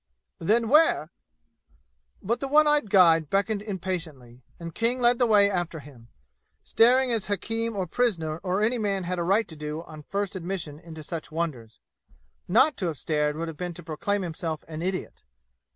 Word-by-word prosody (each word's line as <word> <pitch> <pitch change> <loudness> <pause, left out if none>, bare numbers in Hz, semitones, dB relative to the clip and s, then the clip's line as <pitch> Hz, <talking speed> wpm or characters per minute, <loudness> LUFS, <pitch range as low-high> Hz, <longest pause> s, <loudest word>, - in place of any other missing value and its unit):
"Then, 225 +7 +2
where 275 - +4 0.6
" - - -38
But 230 +5 -1
the 275 - -3
one 300 +3 +5
eyed 295 -7 +2
guide 165 -5 +5
beckoned 200 +1 0
impatiently, 165 - -5 0.2
and 170 -1 -7
King 235 +2 0
led 240 0 +3
the 245 - +3
way 205 -2 +5
after 175 -4 -2
him, 135 -5 -15 0.6
staring 250 +2 +4
as 225 -4 0
hakim 225 +3 -2
or 190 -2 -1
prisoner 170 -10 -1
or 185 +2 -1
any 235 +2 +1
man 200 -3 -1
had 180 0 -3
right 195 +6 +2
to 160 - -8
do 150 +1 -5
on 155 -2 -11
first 200 +5 -3
admission 170 -3 -5
to 155 - -8
such 165 +1 -6
wonders. 145 -9 -4 0.7
Not 260 - +4
to 185 - -1
have 160 -4 -3
stared 150 0 0
would 165 +2 -4
have 160 -2 -7
been 175 0 -5
to 175 - -8
proclaim 185 +6 -2
himself 160 -2 -4
an 160 0 -6
idiot. 185 +1 -4
180 Hz, 180 wpm, -26 LUFS, 160-215 Hz, 0.7 s, one